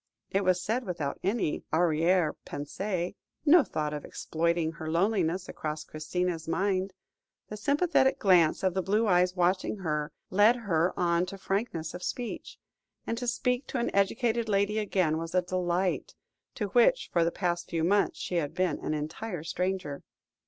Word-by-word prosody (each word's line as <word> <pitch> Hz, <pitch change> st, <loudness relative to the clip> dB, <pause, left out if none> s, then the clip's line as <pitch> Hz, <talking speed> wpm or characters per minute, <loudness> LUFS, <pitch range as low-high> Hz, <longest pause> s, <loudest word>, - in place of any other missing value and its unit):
It 195 Hz, +1 st, +1 dB
was 185 Hz, -1 st, +3 dB
said 230 Hz, +6 st, -1 dB
without 165 Hz, -8 st, -3 dB
any 195 Hz, -5 st, -1 dB
arrière 165 Hz, 0 st, +3 dB
pensée; 175 Hz, +5 st, -3 dB, 0.3 s
no 315 Hz, +1 st, +7 dB
thought 150 Hz, -7 st, -3 dB
of 150 Hz, -, -5 dB
exploiting 165 Hz, 0 st, -1 dB
her 160 Hz, -1 st, -6 dB
loneliness 185 Hz, 0 st, +1 dB
crossed 155 Hz, 0 st, -5 dB
Christina's 165 Hz, +2 st, -2 dB
mind. 190 Hz, +1 st, 0 dB, 0.6 s
The 210 Hz, -, -5 dB
sympathetic 285 Hz, -, +2 dB
glance 180 Hz, -5 st, +4 dB
of 190 Hz, -2 st, +2 dB
the 190 Hz, -, 0 dB
blue 210 Hz, +5 st, +1 dB
eyes 180 Hz, -2 st, +3 dB
watching 185 Hz, +3 st, +1 dB
her, 150 Hz, -5 st, -2 dB, 0.2 s
led 205 Hz, +5 st, +5 dB
her 180 Hz, -7 st, +1 dB
on 175 Hz, 0 st, +2 dB
to 195 Hz, -, -7 dB
frankness 195 Hz, -5 st, -2 dB
of 180 Hz, -, -7 dB
speech, 240 Hz, +4 st, -5 dB, 0.5 s
and 230 Hz, -, -1 dB
to 245 Hz, -, -4 dB
speak 250 Hz, +2 st, 0 dB
to -, -, -3 dB
an 235 Hz, -, -1 dB
educated 220 Hz, +3 st, +1 dB
lady 200 Hz, +1 st, +2 dB
again 185 Hz, -7 st, +1 dB
was 165 Hz, +2 st, -5 dB
a 180 Hz, -, +3 dB
delight, 180 Hz, 0 st, -1 dB, 0.4 s
to 210 Hz, -4 st, -2 dB
which 245 Hz, -, +3 dB
for 170 Hz, -, +4 dB
the 165 Hz, -, +2 dB
past 175 Hz, -1 st, -2 dB
few 165 Hz, -1 st, -1 dB
months 200 Hz, +4 st, +2 dB
she 180 Hz, -, -3 dB
had 150 Hz, -4 st, -2 dB
been 180 Hz, -5 st, 0 dB
an 155 Hz, -, -2 dB
entire 160 Hz, +4 st, -4 dB
stranger. 180 Hz, -4 st, -2 dB
180 Hz, 165 wpm, -29 LUFS, 165-205 Hz, 0.6 s, no